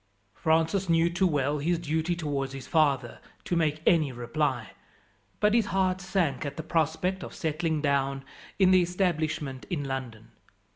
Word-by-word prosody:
Francis 165 - +1
knew 165 +1 +3
too 185 +2 +2
well 145 -2 0
his 170 +4 +1
duty 160 +1 -1
towards 140 -5 -3
his 135 -1 -7
father 140 -7 +1 0.2
to 175 - -1
make 155 -2 0
any 155 -5 +4
reply, 120 0 -2 0.7
but 210 0 +3
his 230 -2 +3
heart 185 -1 +1
sank 180 -8 0
at 140 -1 -5
the 160 - -4
prospect 165 +4 0
of - - -8
settling 160 -2 -1
down 135 -1 0 0.3
in 190 -2 +5
the 185 -1 +6
establishment 160 -7 -1
in 160 -6 -2
London. 130 -5 -6
160 Hz, 155 wpm, -28 LUFS, 140-175 Hz, 0.7 s, the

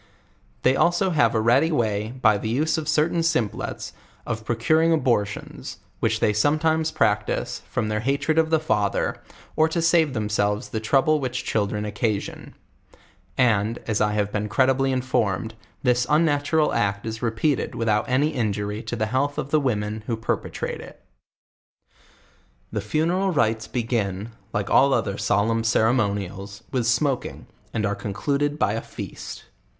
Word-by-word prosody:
They 130 - +4
also 175 +5 +2
have 130 -8 +3
a - - +3
ready 125 +8 +4
w*y, 110 -7 0
by 110 -4 +4
the 110 - -3
use 150 +7 +1
of 155 - -4
certain 165 +2 +2
simples, 160 -10 -2 0.3
of 115 -1 -3
procuring 155 +9 +2
abortions, 120 -10 -1 0.2
which - - +1
they 105 - +2
sometimes 155 +7 +2
practice, 105 -8 0
from 115 -3 -1
their 105 0 -1
hatred 140 +6 +1
of 160 0 +2
the 160 -1 +3
father, 105 -10 0 0.3
or 155 +1 +3
to 170 - -1
save 165 -3 +3
themselves 105 0 -1
the 110 - -2
trouble 135 +7 +2
which 130 -2 -3
chil 105 -2 +1
dren 105 +1 -3
occasion; 105 0 -3 0.8
and, 115 -2 +2
as 110 -2 0
I 105 0 +2
have 105 -1 0
been 105 0 -2
credibly 135 +3 +2
informed, 115 -5 0 0.3
this 125 -1 +2
unnatural 150 0 +2
act 100 -1 0
is 110 0 -5
repeated 120 +5 0
without 110 -1 0
any 140 +4 +2
injury 105 -5 -2
to 120 - -4
the 110 -2 0
health 135 +6 -1
of 135 - -4
the 155 - +4
women 110 -5 -2
who 115 - -1
perpetrate 115 - -3
it. - - -12 1.7
The - - -2
funeral 175 +5 0
rites 110 -6 +1
begin, 110 -4 -2 0.2
like 105 -1 -2
all 135 0 +5
other 100 -4 -2
solemn 115 +2 +1
ceremonials, 100 -4 0
with 125 -3 0
smoking, 135 +1 0 0.3
and 110 -1 -1
are 100 - 0
concluded 140 +9 -1
by 105 - +1
a 115 - -2
feast. - - -8
115 Hz, 155 wpm, -24 LUFS, 105-145 Hz, 1.7 s, all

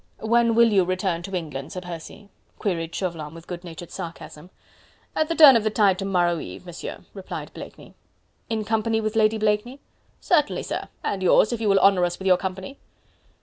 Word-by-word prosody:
"When 235 +1 +2
will 230 -1 +5
you 195 -2 +5
return 185 -1 -1
to 195 +2 -6
England, 150 -6 -5
Sir 185 - -5
Percy?" 175 +3 -9 0.3
queried 165 -5 -3
Chauvelin 165 -5 -4
with 165 0 -12
good 175 0 -7
natured 170 -1 -9
sarcasm. 165 0 -8 0.7
"At 310 - +1
the 330 - 0
turn 295 -5 +9
of 225 - +2
the 215 - +1
tide 200 -3 +2
to 195 - -3
morrow 175 -3 +1
eve, 90 - -9
Monsieur," 175 -1 -7
replied 195 -2 -7
Blakeney. - - -11 0.6
"In 220 -2 -2
company 220 0 0
with 215 0 -3
Lady 220 0 +3
Blakeney?" 215 +5 -1 0.4
"Certainly, 300 -5 +1
sir... - - -4 0.2
and 195 - -2
yours 205 +5 +4
if 230 - -4
you 215 - +1
will 195 - +4
honour 195 -2 +4
us 175 0 -1
with 190 - -9
your 185 -1 +5
company." 190 +9 -6
195 Hz, 190 wpm, -24 LUFS, 175-220 Hz, 0.7 s, turn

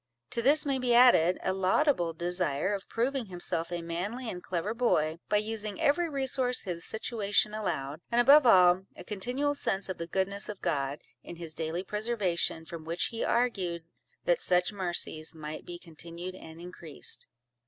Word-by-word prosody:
To 235 - 0
this 295 +5 +5
may 275 -2 0
be 245 -2 +2
added, 210 -8 +6
a 190 - 0
laudable 190 - +2
desire 175 0 0
of 195 -1 -5
proving 245 +1 -1
himself 175 -2 -3
a 175 -1 -3
manly 200 +9 -4
and 180 - -7
clever 185 +5 -2
boy, 165 -10 +1
by 210 - +3
using 210 -1 -2
every 335 +4 +2
resource 265 -3 +1
his 170 -3 -4
situation 215 -2 +1
allowed; 160 -8 -3
and 235 - +1
above 275 +2 +7
all, 185 -2 +6
a - - -10
continual 250 +8 -2
sense 195 -9 -1
of 190 - -5
the 170 - -4
goodness 195 +4 -2
of 205 -2 -6
God, 140 -1 -2 0.2
in 175 - -9
his 165 -2 -4
daily 165 +3 -3
preservation, 200 -7 -1
from 165 -1 -8
which 165 +2 -1
he 230 - -3
argued, 190 -9 0 0.4
that - - +2
such 180 +3 +2
mercies 175 -4 -1
might 155 0 -7
be 175 - -6
continued 170 +2 -9
and 160 -3 -12
increased. 170 -3 -4
190 Hz, 170 wpm, -29 LUFS, 170-235 Hz, 0.4 s, above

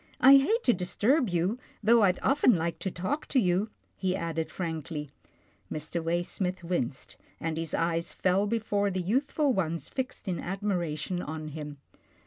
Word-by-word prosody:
I 275 +2 +9
hate 435 - +2
to 245 - +5
disturb 225 - +1
you, 180 +7 0 0.2
though 230 +2 +6
I'd 185 -3 +4
often 270 -4 +4
like 170 0 -2
to 190 - -2
talk 190 - -3
to 265 - +3
you," 185 0 +2 0.3
he 185 -1 0
added 165 -2 -2
frankly. 160 -4 -4 0.6
Mr. 155 +2 -3
Waysmith 175 +2 -1
winced, 155 -7 -3 0.2
and 160 -1 -2
his 165 -1 -2
eyes 165 0 0
fell 190 +2 +2
before 205 -2 0
the 185 -1 -2
youthful 265 - +1
ones 170 -5 -2
fixed 260 -5 -4
in 180 -2 -1
admiration 180 -3 -2
on 155 -1 -5
him. 150 -1 -7
180 Hz, 155 wpm, -29 LUFS, 165-215 Hz, 0.6 s, I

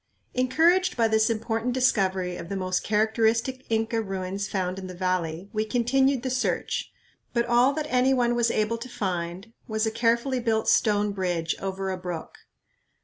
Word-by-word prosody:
Encouraged 330 +8 +3
by 230 -1 +4
this 220 0 +3
important 225 +2 -1
discovery 190 -8 +1
of 170 - -8
the 200 - -3
most 185 -1 -1
characteristic 225 +4 +1
Inca 225 0 0
ruins 195 0 -4
found 185 -1 -2
in 190 - -7
the 185 - -8
valley, 180 -1 -2
we 215 0 +1
continued 255 +3 +1
the 260 - -2
search, 255 - -1 0.4
but 235 -1 +1
all 240 +2 +4
that 305 +1 -2
any 255 -1 +3
one 245 -2 +2
was 235 -1 +2
able 225 +1 0
to 255 +2 -7
find 185 0 -4
was 220 -1 0
a 220 - 0
carefully 235 +3 +1
built 225 -2 0
stone 210 -3 +3
bridge 175 -4 -1
over 195 0 -3
a 185 - -3
brook. 180 -3 -6
220 Hz, 170 wpm, -26 LUFS, 190-245 Hz, 0.4 s, by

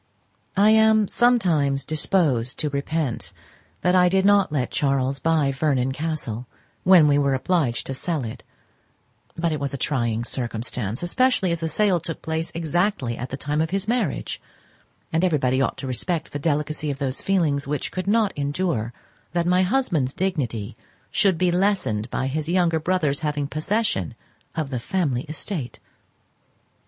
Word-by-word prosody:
I 210 +2 +6
am 220 -1 +5
sometimes 170 - +2
disposed 150 - +1
to 150 - -2
repent 140 -2 -2 0.5
that 180 - +2
I 180 -1 +5
did 190 +1 +2
not 200 -3 +4
let 130 -5 -1
Charles 135 -1 0
buy 160 -4 +2
Vernon 135 -2 0
Castle, 135 -6 -3 0.4
when 180 -5 +7
we 145 0 +4
were 140 -1 +2
obliged 130 -4 0
to 135 - -4
sell 155 +1 -2
it; 115 +2 -7 0.9
but 165 0 0
it 155 - -2
was 140 0 -2
a - - -4
trying 120 -4 0
circumstance, 120 - -3
especially 195 0 +2
as 170 - -1
the 165 0 -2
sale 190 +2 +2
took 165 0 -6
place 160 +1 -2
exactly 170 - 0
at 125 +2 -6
the 135 - -5
time 150 +2 -1
of 160 - 0
his 195 +3 -2
marriage; 225 - -1 0.7
and 165 +2 +2
everybody 135 -7 +2
ought 135 - 0
to 135 - -6
respect 155 +6 -2
the 145 - -4
delicacy 150 0 -1
of 140 - -3
those 135 -2 -2
feelings 155 -8 +1
which 145 0 -2
could 185 +1 -4
not 215 -1 +2
endure 145 -5 -1 0.4
that 170 -1 +1
my 180 +1 +3
husband's 180 - 0
dignity 125 - -2 0.4
should 190 -4 +2
be 180 +1 +2
lessened 175 - 0
by 130 - -2
his 155 +4 -2
younger 170 -2 +2
brother's 155 -4 0
having 150 -2 -1
possession 155 - -1 0.4
of 155 -4 -3
the 125 - -2
family 135 -3 -1
estate. 155 -3 -4
155 Hz, 160 wpm, -23 LUFS, 135-180 Hz, 0.9 s, when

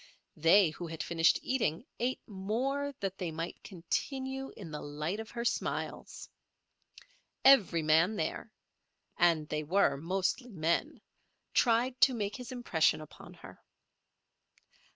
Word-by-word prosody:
They 165 +2 +5
who 175 +2 -7
had 160 -1 -5
finished 165 -1 +3
eating 245 -7 -1
ate 250 +2 -2
more 245 +9 -2
that 195 -1 -3
they 180 -3 -2
might 165 +1 -6
continue 265 +8 -3
in 175 -6 -9
the 150 - -5
light 150 +7 -4
of 220 0 -7
her 235 0 -5
smiles. - - -3 1.2
Every 205 -12 +6
man 165 +7 +4
there—and 170 -5 -2
they 150 - -1
were 155 -3 +2
mostly 190 - -1
men—tried 235 - -1
to 260 - +6
make 205 -2 -3
his 250 0 -8
impression 235 -13 +1
upon 155 - -12
her. - - -13
195 Hz, 120 wpm, -31 LUFS, 165-245 Hz, 1.2 s, Every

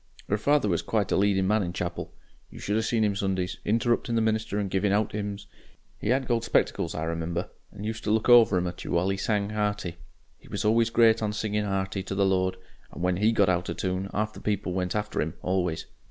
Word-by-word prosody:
"'Er - - +4
father 145 0 +3
was 85 -4 +1
quite 105 -3 -1
a - - +3
leadin' 95 -1 +2
man 105 +2 +3
in 90 -3 -2
chapel. 90 -1 -4 0.4
You - - -13
should 105 - -2
ha' 110 - +2
seen 110 0 +1
him 105 -2 +1
Sundays, 95 -2 -2
interruptin' 115 +2 +1
the 115 - +3
minister 110 -2 0
and 105 -1 0
givin' 95 +1 0
out 105 +1 +1
'ims. 100 -1 -4 0.5
He - - -3
had 130 +2 +2
gold 115 -2 +1
spectacles, 115 - 0
I 80 - -2
remember, 85 +3 -3 0.2
and 105 0 -8
used 110 +1 -4
to - - 0
look 110 0 +1
over 115 -6 +7
'em 90 - 0
at 90 0 -5
you - - -7
while 90 +2 +2
he 95 - 0
sang 105 0 0
hearty 105 -5 -2 0.4
he - - -19
was 100 +2 -3
always 115 +1 +3
great 115 -1 +4
on 105 -1 -1
singing 105 0 -1
'earty 95 0 -2
to 95 - -3
the 100 0 +3
Lord 95 -1 +1 0.3
and - - -7
when 90 0 +1
HE 105 +3 +3
got 100 -3 +3
out 90 -1 0
o' - - -1
toon 95 +1 -2
'arf 105 +2 -2
the - - -11
people 100 -3 -1
went 90 0 -2
after 105 0 -1
'im 80 +3 -3
always. 90 -3 -1
100 Hz, 240 wpm, -27 LUFS, 95-110 Hz, 0.5 s, over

